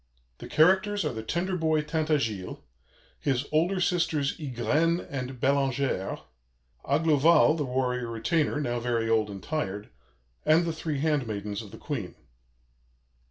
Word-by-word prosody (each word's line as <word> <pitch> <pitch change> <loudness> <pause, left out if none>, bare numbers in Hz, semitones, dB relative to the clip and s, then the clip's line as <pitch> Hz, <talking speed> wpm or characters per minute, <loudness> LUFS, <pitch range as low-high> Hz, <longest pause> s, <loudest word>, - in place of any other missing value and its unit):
The - - -8
characters 190 +5 +3
are - - -1
the 110 - -5
tender 175 +10 -2
boy 160 -2 +1
Tintagiles; 150 - -1 0.6
his 135 -1 0
older 170 +5 +2
sisters, 165 -5 +1
Ygraine 150 +5 +1
and 130 -2 -5
Bellangère; 135 -6 0 0.6
Aglovale, 155 +2 +4
the 150 -3 -2
warrior 125 -1 -1
retainer, 145 +7 0
now 120 -4 -1
very 115 -1 -1
old 110 -2 +2
and 100 -2 -8
tired; 105 -10 -3 0.5
and 160 +2 +4
the 165 - -1
three 155 -3 -3
handmaidens 110 -9 -1
of 105 - -11
the - - -11
Queen. 120 - -5
140 Hz, 130 wpm, -27 LUFS, 120-160 Hz, 0.6 s, Aglovale